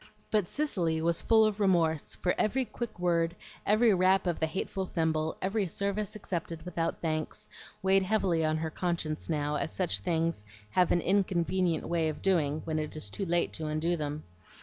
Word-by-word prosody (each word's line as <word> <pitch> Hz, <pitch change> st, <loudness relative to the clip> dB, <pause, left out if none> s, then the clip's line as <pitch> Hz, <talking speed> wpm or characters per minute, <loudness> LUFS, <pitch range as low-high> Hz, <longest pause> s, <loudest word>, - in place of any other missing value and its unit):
But 210 Hz, -5 st, +1 dB
Cicely 180 Hz, -, 0 dB
was 165 Hz, +1 st, +1 dB
full 220 Hz, -1 st, +5 dB
of 215 Hz, -1 st, 0 dB
remorse; 170 Hz, -6 st, +2 dB
for 180 Hz, -, 0 dB
every 255 Hz, +5 st, +1 dB
quick 235 Hz, +1 st, -6 dB
word, 170 Hz, -1 st, +1 dB, 0.3 s
every 215 Hz, +1 st, +5 dB
rap 190 Hz, +1 st, +3 dB
of 175 Hz, -2 st, -1 dB
the 160 Hz, -, +1 dB
hateful 190 Hz, +2 st, -3 dB
thimble, 160 Hz, -2 st, 0 dB
every 195 Hz, +1 st, 0 dB
service 200 Hz, +4 st, -2 dB
accepted 170 Hz, -5 st, -4 dB
without 165 Hz, -2 st, -2 dB
thanks, 155 Hz, -2 st, -3 dB, 0.4 s
weighed 195 Hz, 0 st, +4 dB
heavily 185 Hz, -4 st, +1 dB
on 155 Hz, 0 st, +1 dB
her 160 Hz, 0 st, -3 dB
conscience 170 Hz, -3 st, -2 dB
now, 150 Hz, -2 st, 0 dB
as 160 Hz, -, -2 dB
such 175 Hz, -, 0 dB
things 165 Hz, -, -1 dB, 0.3 s
have 180 Hz, +6 st, +3 dB
an 175 Hz, -, +3 dB
inconvenient 180 Hz, -2 st, +1 dB
way 165 Hz, -2 st, +1 dB
of 155 Hz, -, -6 dB
doing 155 Hz, -6 st, +1 dB
when 155 Hz, -1 st, -1 dB
it 155 Hz, 0 st, -4 dB
is 150 Hz, -10 st, -5 dB
too 195 Hz, -, -3 dB
late 170 Hz, 0 st, +1 dB
to 155 Hz, -, -3 dB
undo 155 Hz, +3 st, 0 dB
them. 150 Hz, -1 st, -4 dB
170 Hz, 180 wpm, -30 LUFS, 160-190 Hz, 0.4 s, full